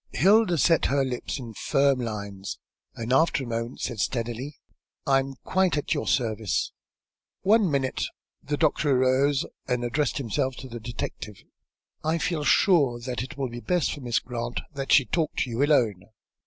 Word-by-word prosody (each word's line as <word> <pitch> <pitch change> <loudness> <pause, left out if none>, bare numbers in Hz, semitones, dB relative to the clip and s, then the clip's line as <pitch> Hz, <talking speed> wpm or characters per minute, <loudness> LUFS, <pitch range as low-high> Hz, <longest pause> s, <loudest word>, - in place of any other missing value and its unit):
Hilda 200 -1 +4
set 165 +3 +4
her 140 0 +2
lips 125 +1 -3
in 120 -4 -8
firm 135 +3 +2
lines, 100 -4 -5 0.4
and 115 +2 -2
after 150 0 +3
a - - -7
moment 115 +1 -4
said 120 -4 -3
steadily 120 +5 -2 0.5
"I 135 -1 +4
am 135 0 -4
quite 185 -4 +2
at 145 - 0
your 145 - -2
service." 110 -5 0 0.7
"One 205 0 +4
minute." 135 -3 0 0.4
The 145 +1 -2
doctor 155 -1 +2
arose 135 +2 +3 0.2
and 125 -1 0
addressed 145 +5 0
himself 130 0 -1
to 130 - -9
the 120 -1 -7
detective. 110 -3 -6 0.6
"I 160 +2 +1
feel 165 -2 -1
sure 145 -8 +4
that 125 -3 -3
it 135 +4 -7
will 135 -2 -2
be 120 +1 -7
best 180 +6 0
for 145 - -8
Miss 120 -2 0
Grant 120 0 -3
that 135 -1 -4
she 140 - +6
talk 160 +2 -1
with - - +1
you 120 +2 -1
alone. 115 -10 +2
130 Hz, 170 wpm, -26 LUFS, 120-145 Hz, 0.7 s, she